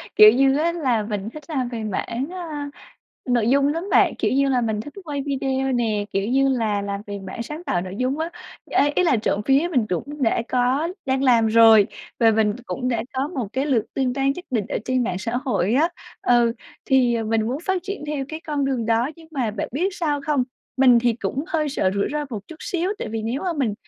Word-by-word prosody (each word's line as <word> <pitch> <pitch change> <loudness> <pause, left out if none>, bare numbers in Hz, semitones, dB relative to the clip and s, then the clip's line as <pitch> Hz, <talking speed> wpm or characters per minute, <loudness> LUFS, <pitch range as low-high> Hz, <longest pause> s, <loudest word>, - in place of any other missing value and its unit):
Kiểu 215 0 +10
như 270 +2 +3
á, 330 +3 +2
là 255 -10 0
mình 210 -1 -4
thích 305 +5 -10
làm 260 -6 -1
về 230 -2 -5
mảng, 230 - -3
a, 310 -6 -5 0.6
nội 235 -3 +2
dung 280 +1 +4
lắm 330 +5 -2
bạn, - - +4
kiểu - - +1
như 275 +1 +3
là, 255 -2 +2
mình 220 -3 -1
thích 290 +7 -9
quay 290 -3 -3
video 270 -1 -1
nè, 220 -4 0
kiểu 195 +2 0
như 270 +2 +3
là, 220 -6 0
làm 200 0 -3
về 205 0 -5
mảng 190 +5 -5
sáng 300 +8 -7
tạo 175 - 0
nội 185 +1 -6
dung 255 +3 0
á. 325 +1 -2 0.4
Ê, 290 - +3
ý 365 - +3
là 325 -8 +3
trộm 210 -2 0
vía 275 +5 +3
mình 250 -9 +1
cũng 285 - -4
đã 230 -1 +2
có 255 +5 +1 0.2
đang 265 0 +1
làm 240 -4 +4
rồi 220 -2 +7 0.3
và 225 -1 +6
mình 215 -1 +2
cũng 250 -1 -3
đã 230 -3 0
có 265 +2 -1
một 270 - -3
cái 265 +2 -1
lượt 250 -7 +2
tương 255 -2 0
tác 270 0 -1
nhất 360 - -8
định 220 -6 0
ở - - -1
trên 255 -1 +1
mạng 180 -4 -2
xã 220 +4 -4
hội 225 -5 +1
á. 310 +6 +4 0.3
Ừ, 240 -1 +4 0.3
thì, 255 -3 +3
ờ, 225 -1 -1
mình 220 0 +1
muốn 255 +4 -2
phát 380 -2 0
triển 395 -4 -5
theo 295 -2 -2
cái 315 +1 -6
con 295 -4 -2
đường 260 -4 -1
đó, 230 +4 +2
nhưng 325 -1 -16
mà 260 -8 -1
bạn 205 -1 -4
biết 335 +9 +1
sao 300 -7 -1
không? 290 -4 +2 0.3
Mình 255 -2 +6
thì 240 0 +2
cũng 265 +5 -3
hơi 320 -5 0
sợ 195 -9 0
rủi 200 - +1
ro 300 0 -1
một 215 -4 -4
chút 325 - -10
xíu, 360 +2 -1
tại - - -4
vì 220 0 -3
nếu 235 +5 -2
mà 365 - -1
mình 265 -10 -1
255 Hz, 240 wpm, -22 LUFS, 225-290 Hz, 0.6 s, Kiểu